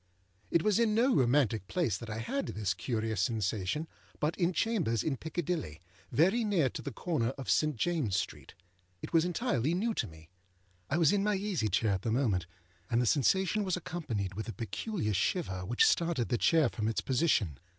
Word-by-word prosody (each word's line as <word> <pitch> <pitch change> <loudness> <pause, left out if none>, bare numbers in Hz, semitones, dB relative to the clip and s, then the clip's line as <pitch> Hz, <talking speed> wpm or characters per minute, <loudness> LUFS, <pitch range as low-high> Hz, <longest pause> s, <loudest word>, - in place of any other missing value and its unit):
It 170 - +2
was 215 0 +3
in 220 -2 +2
no 245 +4 +3
romantic 120 -6 +2
place 165 - 0
that 115 +2 -7
I 110 - -4
had 270 - -2
this 100 -4 -1
curious 110 +2 -2
sensation, 110 - -1 0.3
but 150 +2 0
in 175 0 +1
chambers 170 - 0
in 150 - 0
Piccadilly, 160 - -3 0.3
very 190 - +3
near 185 -11 +2
to - - -6
the 140 - -5
corner 130 -2 -1
of 135 - -2
St. 155 -2 +2
Jamesâs 155 - 0
Street. - - -4 0.5
It - - -7
was 165 0 +4
entirely 170 - 0
new 225 +5 0
to 115 - -2
me. 80 -1 -15 0.6
I 150 - +1
was 165 -1 +4
in 200 -1 +2
my 210 0 +2
easy 190 - -1
chair 110 0 +1
at 95 -2 -1
the 115 - -2
moment, 110 -9 +1 0.4
and 115 - +2
the 125 - +2
sensation 190 - +2
was 185 -2 0
accompanied 125 - -4
with 110 +4 -5
a - - -4
peculiar 115 - -3
shiver 95 - -1
which 120 +3 +4
started 165 -8 +1
the 120 - +1
chair 160 -4 +4
from 110 -2 -3
its 110 - 0
position. 125 - +1
140 Hz, 190 wpm, -31 LUFS, 110-175 Hz, 0.6 s, was